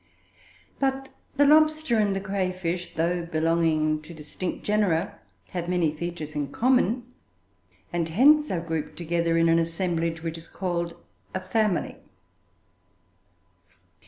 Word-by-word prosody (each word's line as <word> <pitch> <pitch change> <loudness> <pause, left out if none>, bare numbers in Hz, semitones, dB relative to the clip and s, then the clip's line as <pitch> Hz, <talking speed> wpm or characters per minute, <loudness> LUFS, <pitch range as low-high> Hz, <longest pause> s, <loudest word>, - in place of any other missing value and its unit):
But 270 0 -1 0.3
the 285 +1 +5
lobster 310 -4 +4
and 205 -2 +2
the - - 0
cray 195 -2 -1
fish, 180 -1 -4
though 170 +2 0
belonging 160 -2 +1
to 165 +2 -11
distinct 155 +4 -5
genera, 200 -4 +1 0.3
have 175 -1 -4
many 170 -4 +1
features 160 -2 -5
in 145 -2 -2
common, 250 - +2 0.9
and 170 -1 -1
hence 295 - +5
are 175 -3 -1
grouped 160 -2 -4
together 170 0 0
in 165 0 +4
an 165 0 +4
assemblage 165 -1 -1
which 165 0 -4
is 165 - -14
called 170 -2 -3 0.4
a - - 0
family. 195 0 0
175 Hz, 130 wpm, -26 LUFS, 165-205 Hz, 0.9 s, the